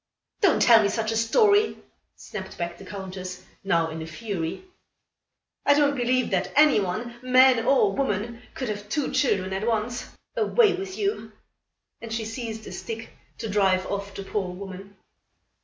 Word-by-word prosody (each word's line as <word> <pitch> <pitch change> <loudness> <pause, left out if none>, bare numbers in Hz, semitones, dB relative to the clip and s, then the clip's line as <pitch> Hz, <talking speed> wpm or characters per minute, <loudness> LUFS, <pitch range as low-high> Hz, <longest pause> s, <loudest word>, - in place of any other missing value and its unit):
"Don't 390 -7 +4
tell 230 -2 +7
me 200 - +2
such 220 +1 -1
a - - -1
story," 410 - +3 0.4
snapped 190 -3 -8
back 170 0 -3
the - - -10
Countess, 185 -2 -7 0.2
now 165 -4 +1
in 160 0 -6
a 160 - -6
fury. 175 - -4 1.0
"I 285 - +5
don't 285 -1 +3
believe 255 0 +1
that 190 -1 0
any 295 -4 +6
one, 215 +6 -3
man 255 -2 +5
or 215 -8 +4
woman, 235 -2 -2
could 260 - -3
have 205 0 -5
two 290 +3 -1
children 190 -8 +1
at 195 +4 -2
once. 235 +1 -1 0.3
Away 450 -2 +4
with 380 0 -5
you," 405 0 -2 0.7
and 230 -1 -8
she 225 -1 -2
seized 225 -1 -6
a - - -8
stick 225 0 -6 0.3
to 225 - -5
drive 195 -3 +2
off 200 0 -4
the 195 - -5
poor 195 -2 -3
woman. 195 +1 -9
220 Hz, 165 wpm, -25 LUFS, 195-255 Hz, 1.0 s, tell